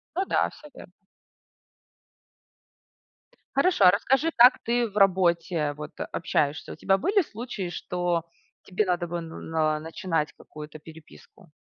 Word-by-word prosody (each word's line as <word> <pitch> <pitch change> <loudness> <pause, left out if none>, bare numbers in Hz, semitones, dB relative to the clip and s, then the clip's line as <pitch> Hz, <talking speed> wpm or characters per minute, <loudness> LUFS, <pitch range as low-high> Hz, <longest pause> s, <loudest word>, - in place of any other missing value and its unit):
Ну 380 - 0
да, - - +1
всё 300 - -15
верно. 180 - -13 2.6
Хорошо, 310 - +3
а 180 - +9
расскажи, 270 - +1
как 245 +3 +7
ты 240 0 +1
в 205 - -9
работе, 175 -5 +2
вот, 150 +1 -8 0.2
общаешься. 150 -3 -1
У - - -10
тебя 195 0 +2
были 400 - +2
случаи, 225 - -6
что 175 -1 -2 0.4
тебе 195 +3 -1
надо 175 -1 -1
бы 170 0 -4
на 165 0 -9
на 155 -1 0
начинать 165 0 -3
какую-то 150 0 -11
переписку? 160 +4 -16
180 Hz, 135 wpm, -26 LUFS, 160-215 Hz, 2.6 s, а